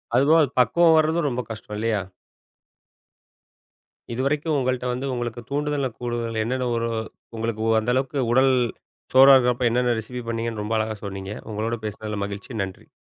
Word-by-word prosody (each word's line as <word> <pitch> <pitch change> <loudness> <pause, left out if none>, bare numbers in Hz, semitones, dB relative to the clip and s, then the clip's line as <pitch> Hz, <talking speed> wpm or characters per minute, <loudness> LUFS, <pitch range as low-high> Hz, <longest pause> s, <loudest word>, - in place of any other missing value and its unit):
அது 130 - +5
போக 165 +1 +7
அது 140 - -2
பக்குவம் 160 +7 +5
வரதும் 155 0 +2
ரொம்ப 125 -1 -2
கஷ்டம் 105 -1 -7
இல்லையா? 110 -2 0 2.1
இதுவரைக்கும் 145 +5 0
உங்கள்ட்ட 125 -1 -1
வந்து 130 +2 -4
உங்களுக்கு 120 -1 -4
தூண்டுதல 145 -1 -1
கூடுதல, 120 -2 -2
என்னென்ன, 130 +1 -1
ஒரு 115 0 -1 0.5
உங்களுக்கு 110 -1 -3
ஒ - - +2
அந்த 110 +3 -1
அளவுக்கு, 135 +2 -1
உடல் 130 +2 +5 0.6
சோர்வா 135 +1 +9
இருக்கறப்போ, 125 -1 +2
என்னென்ன 120 0 +1
ரெசிபி 125 +3 -6
பண்ணிங்கன்னு, 115 -2 -2
ரொம்ப 110 +2 -1
அழகா 110 -1 -2
சொன்னீங்க. 95 0 -5 0.2
உங்களோட 110 +2 -2
பேசினதில 105 0 -5
மகிழ்ச்சி 100 +3 -7
நன்றி. 95 -1 -9
120 Hz, 150 wpm, -24 LUFS, 110-130 Hz, 2.1 s, சோர்வா